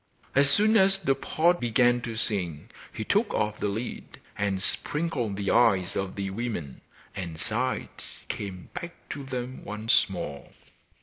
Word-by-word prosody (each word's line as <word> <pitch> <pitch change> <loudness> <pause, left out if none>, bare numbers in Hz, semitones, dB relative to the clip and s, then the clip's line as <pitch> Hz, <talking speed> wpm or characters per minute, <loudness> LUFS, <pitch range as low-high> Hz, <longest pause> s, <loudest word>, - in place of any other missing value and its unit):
As 140 0 +5
soon 215 +8 +5
as 195 -1 +5
the 165 -8 +2
pot 170 +5 +2
began 120 +1 +3
to 115 -1 -5
sing 95 -4 -1 0.2
he 110 - -4
took 205 - +1
off 105 0 0
the - - 0
lid, 110 +5 -5 0.2
and 100 -2 0
sprinkled 135 - -1
the 100 0 -1
eyes 100 -7 +4
of 95 -1 -2
the 100 -1 -3
women, 100 - -4 0.3
and 85 -5 -5
sight 120 +6 -2 0.2
came 95 -3 -6
back 170 0 -6
to 140 - -5
them 130 -1 -5
once 105 +2 +2
more. 70 -1 -6
115 Hz, 150 wpm, -27 LUFS, 100-135 Hz, 0.3 s, As